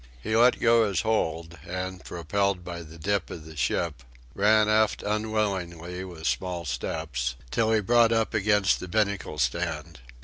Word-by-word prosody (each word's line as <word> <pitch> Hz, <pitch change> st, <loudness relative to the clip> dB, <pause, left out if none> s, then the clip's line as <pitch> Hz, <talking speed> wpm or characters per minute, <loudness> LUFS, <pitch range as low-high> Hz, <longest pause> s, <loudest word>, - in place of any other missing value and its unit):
He 110 Hz, -, -2 dB
let 120 Hz, +2 st, +5 dB
go 115 Hz, -1 st, +4 dB
his 100 Hz, -, 0 dB
hold, 85 Hz, -7 st, -1 dB
and, 90 Hz, +1 st, -5 dB
propelled 90 Hz, +2 st, -1 dB
by 85 Hz, -1 st, -6 dB
the 80 Hz, 0 st, -12 dB
dip 100 Hz, +3 st, -1 dB
of 80 Hz, -2 st, -8 dB
the 80 Hz, 0 st, -11 dB
ship, 75 Hz, 0 st, -1 dB, 0.3 s
ran 105 Hz, +2 st, +4 dB
aft 110 Hz, 0 st, +2 dB
unwillingly, 95 Hz, -5 st, -2 dB
with 85 Hz, -3 st, -9 dB
small 90 Hz, -2 st, -1 dB
steps, 65 Hz, -1 st, -3 dB, 0.2 s
till 110 Hz, -1 st, +2 dB
he 110 Hz, -1 st, +3 dB
brought 115 Hz, +2 st, +4 dB
up 115 Hz, -1 st, +1 dB
against 105 Hz, -1 st, +3 dB
the 90 Hz, -, -6 dB
binnacle 100 Hz, -4 st, -1 dB
stand. 65 Hz, -2 st, -2 dB
95 Hz, 160 wpm, -27 LUFS, 85-110 Hz, 0.3 s, let